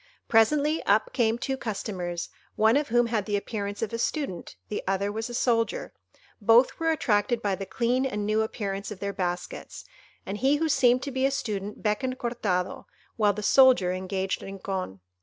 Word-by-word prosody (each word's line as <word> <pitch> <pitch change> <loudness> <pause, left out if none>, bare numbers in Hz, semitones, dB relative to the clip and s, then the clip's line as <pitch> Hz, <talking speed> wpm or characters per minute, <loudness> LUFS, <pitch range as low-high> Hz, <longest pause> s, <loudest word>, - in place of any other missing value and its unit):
Presently 295 +8 +3
up 210 +2 +3
came 230 -2 +2
two 265 +2 -2
customers, 185 -7 -4 0.3
one 220 +1 +4
of 290 +1 +1
whom 240 +1 +3
had 225 -3 -1
the 205 -1 +1
appearance 205 0 -4
of 225 - -3
a 230 - -2
Student, 235 - -3
the 210 - -3
other 195 +1 0
was 220 +2 -4
a - - -7
Soldier; 230 -2 0 0.5
both 230 +4 +5
were 325 0 +1
attracted 235 -6 +1
by 205 -3 -1
the 195 0 -4
clean 250 +2 0
and 210 -4 -3
new 215 +1 +2
appearance 200 -3 -3
of 210 -3 -8
their 200 0 -3
baskets; 180 - -4 0.4
and 205 +2 -4
he 270 +3 +3
who 320 +2 0
seemed 250 -3 +4
to 280 - -4
be 260 +1 +1
a - - +1
student 210 -7 -4
beckoned 255 +5 0
Cortado, 205 -8 -2 0.3
while 210 -3 +3
the 210 +1 -6
soldier 255 -6 +5
engaged 190 +1 -2
Rincon. 190 - -5
220 Hz, 180 wpm, -27 LUFS, 200-250 Hz, 0.5 s, both